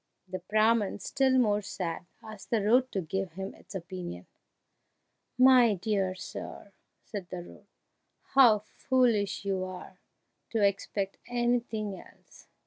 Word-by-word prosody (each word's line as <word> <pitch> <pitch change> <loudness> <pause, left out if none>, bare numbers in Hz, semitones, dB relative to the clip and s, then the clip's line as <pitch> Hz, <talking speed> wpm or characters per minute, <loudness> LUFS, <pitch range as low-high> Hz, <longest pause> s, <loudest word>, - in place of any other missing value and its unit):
The 185 0 -5
Brahman, 215 +2 +2
still 260 +5 +1
more 210 -4 +3
sad, 175 -4 -5 0.2
asked 215 -2 -11
the 225 -4 +1
road 250 +4 +4
to 195 - -1
give 185 +1 -3
him 190 +2 -6
its - - -14
opinion. 175 - -6 1.1
"My 250 -4 +6
dear 190 -1 -1
sir," 200 +2 -8 0.3
said 195 -4 -7
the 175 -1 -5
road, - - -15 0.7
"how 245 -6 +7 0.2
foolish 225 -7 +2
you 190 -1 0
are 185 0 -8 0.5
to 225 -2 0
expect 200 0 0
anything 240 -4 -1
else! - - -19
205 Hz, 130 wpm, -29 LUFS, 185-230 Hz, 1.1 s, how